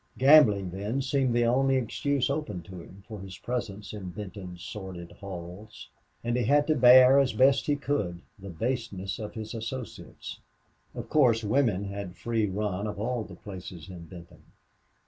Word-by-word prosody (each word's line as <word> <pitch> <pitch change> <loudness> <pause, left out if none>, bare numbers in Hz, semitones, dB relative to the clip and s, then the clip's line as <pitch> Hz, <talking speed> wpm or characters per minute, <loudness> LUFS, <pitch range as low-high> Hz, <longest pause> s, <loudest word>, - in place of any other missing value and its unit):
Gambling, 125 - +6
then, 100 +8 -3
seemed 135 -3 +1
the 120 0 +3
only 135 +3 +3
excuse 130 +2 0
open 140 - -3
to 95 -2 -10
him 95 +3 -14
for 110 -2 -8
his 95 -1 -9
presence 110 -5 -4
in 100 -4 -6
Benton's 95 -3 -8
sordid 95 -4 -7
halls. 95 +2 -9 0.3
And 120 0 -1
he 125 -2 +1
had 145 +4 +4
to 155 - +2
bear 130 +2 +8
as 135 -2 +2
best 135 +1 +4
he 145 - +3
could 105 -12 -2 0.2
the 100 0 -9
baseness 100 -1 -3
of 105 -1 -6
his 110 -1 -6
associates; 115 +1 -7 0.6
of - - -6
course, 120 -7 +4
women 105 -3 +1
had 100 -2 -6
free 110 +4 0
run 100 0 -2
of 105 -1 -5
all 120 +1 -1
the - - -11
places 95 -4 -9
in 85 -2 -9
Benton. 85 0 -13
105 Hz, 165 wpm, -28 LUFS, 95-125 Hz, 0.6 s, bear